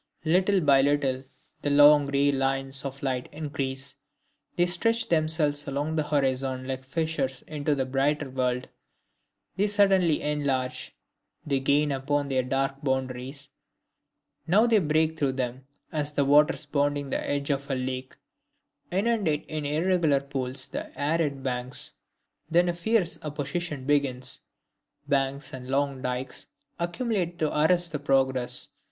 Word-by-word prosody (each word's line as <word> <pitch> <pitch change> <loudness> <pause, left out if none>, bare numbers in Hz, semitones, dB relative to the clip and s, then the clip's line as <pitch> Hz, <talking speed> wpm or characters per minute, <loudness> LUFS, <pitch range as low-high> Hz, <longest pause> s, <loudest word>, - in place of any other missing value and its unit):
Little 185 +4 +3
by 140 -3 +5
little 135 -2 +1 0.4
the 145 - -1
long 145 0 +6
gray 140 0 +2
lines 135 0 0
of 135 0 -6
light 130 -2 -2
increase, 140 -3 -4 0.6
they 175 - +3
stretch 230 +6 +1
themselves 155 -2 +1
along 145 +3 -2
the 155 - +2
horizon 130 -2 0
like 130 -1 -4
fissures 140 -2 -2
into 145 -1 -2
a 130 - +1
brighter 140 +3 0
world. 125 -1 -1 0.9
They 205 +2 +2
suddenly 195 -6 +3
enlarge, 140 -4 -2 0.5
they 140 -2 0
gain 145 +2 +2
upon 140 +1 -1
their 130 -1 +1
dark 135 +2 -2
boundaries, 130 +1 -3 1.0
now 205 +7 +5
they 230 -3 +4
break 160 -1 +1
through 135 -2 +1
them, 130 0 -4 0.2
as 150 -1 -1
the 140 -1 +1
waters 150 +2 +4
bounding 145 -1 -1
the - - 0
edge 145 0 -1
of 140 +1 -3
a 135 - 0
lake 130 0 -4 0.7
inundate 195 -6 0
in 155 -2 -4
irregular 160 -1 +2
pools 130 -1 -1
the - - -7
arid 145 -2 0
banks. 125 -1 0 0.6
Then 175 +2 +3
a - - 0
fierce 180 +1 0
opposition 150 0 -4
begins, 130 -3 +2 0.7
banks 140 0 0
and 125 -1 -8
long 135 0 -1
dikes 125 0 -4 0.3
accumulate 175 0 -2
to 155 -2 -1
arrest 170 +3 +2
the 150 - -3
progress. 135 -3 +2
145 Hz, 135 wpm, -27 LUFS, 135-155 Hz, 1.0 s, long